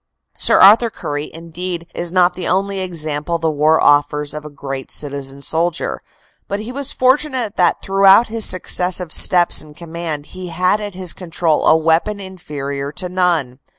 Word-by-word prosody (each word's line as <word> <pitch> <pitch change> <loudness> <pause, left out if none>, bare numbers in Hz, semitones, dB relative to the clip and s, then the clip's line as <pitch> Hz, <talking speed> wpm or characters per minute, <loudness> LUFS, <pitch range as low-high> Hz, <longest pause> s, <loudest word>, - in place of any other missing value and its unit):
Sir - - +3
Arthur 220 +4 +7
Currie, 145 -7 -5
indeed, 170 +1 -6
is 175 -1 -3
not 180 -1 +3
the 180 - -4
only 195 +1 0
example 165 -3 -3
the 165 -1 -1
war 155 +2 +2
offers 145 0 +2
of 150 0 -7
a 150 - -9
great 135 -2 -7
citizen 140 -1 -3
soldier, 165 +2 -2 0.5
but 200 - -3
he 220 +3 -6
was 275 +1 -1
fortunate 255 -4 +1
that 175 -2 +2
throughout 195 +3 +5
his 225 0 -2
successive 180 -2 +1
steps 175 -1 +3
in 150 -1 -15
command 165 -3 -6
he 185 -1 -7
had 180 +5 0
at 205 -3 -6
his 185 -2 -2
con 180 -3 -11
trol 165 -2 0
a 160 - +6
weapon 165 +6 +1
inferior 145 -7 -6
to 180 +2 -3
none. 170 -8 0
175 Hz, 170 wpm, -17 LUFS, 150-190 Hz, 0.5 s, Arthur